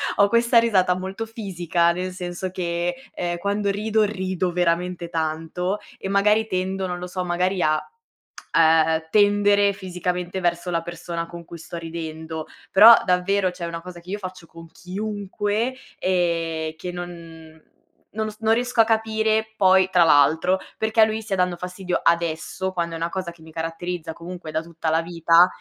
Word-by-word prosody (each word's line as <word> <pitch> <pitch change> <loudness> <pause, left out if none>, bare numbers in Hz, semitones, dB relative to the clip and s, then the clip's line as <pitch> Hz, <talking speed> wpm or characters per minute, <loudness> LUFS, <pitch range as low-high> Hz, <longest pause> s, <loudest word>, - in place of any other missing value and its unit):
ho 200 - +5
questa 235 +2 +3
risata 185 -6 +3
molto 190 +4 -5
fisica, 175 -6 0
nel 185 +1 -3
senso 180 0 -5
che 175 0 -2 0.2
ehm, 175 -1 -2
quando 200 +1 -1
rido, 215 +2 +1
rido 185 -3 -2
veramente 175 0 0
tanto 165 +4 -2 0.2
e - - -5
magari 210 +3 +3
tendo, 190 0 -2
non 180 -1 -4
lo 180 - -5
so, 180 0 -4
magari 180 +2 0
a, 155 -1 +3 0.7
ehm, 160 0 +4
tendere 205 -1 +4
fisicamente 180 -1 -3
verso 175 0 -1
la 170 -1 0
persona 170 0 -5
con 170 -1 -10
cui 170 - -10
sto 170 +1 -8
ridendo. 160 -1 -6 0.2
Però 225 +4 +10
davvero 185 +1 +2
cioè 180 -1 -6
una 165 0 -5
cosa 180 -1 -10
che 175 +2 -15
io 205 - -2
faccio 185 -3 -8
con 165 0 -13
chiunque 205 +4 -3 0.2
e 165 -3 0
che 180 +3 -5
non 165 -2 -9 0.5
non 215 0 -3
s 215 - -17
non 225 0 +3
riesco 245 -1 +2
a - - +4
capire 220 0 +1
poi, 190 -2 +5
tra 180 -2 +5
l'altro, 160 +4 +4 0.2
perché 220 0 +2
a - - +9
lui 220 0 -2
stia 210 -3 -2
dando 180 -1 0
fastidio 180 0 -3
adesso 170 +2 0
quando 170 -2 -2
è - - -4
una 165 +1 -2
cosa 185 -2 -4
che 165 -2 -18
mi 160 - -13
caratterizza 165 +1 -4
comunque 170 0 -8
da 160 +1 -1
tutta 165 -1 -4
la 160 +1 +2
vita, 170 +1 +4
180 Hz, 170 wpm, -23 LUFS, 170-200 Hz, 0.7 s, Però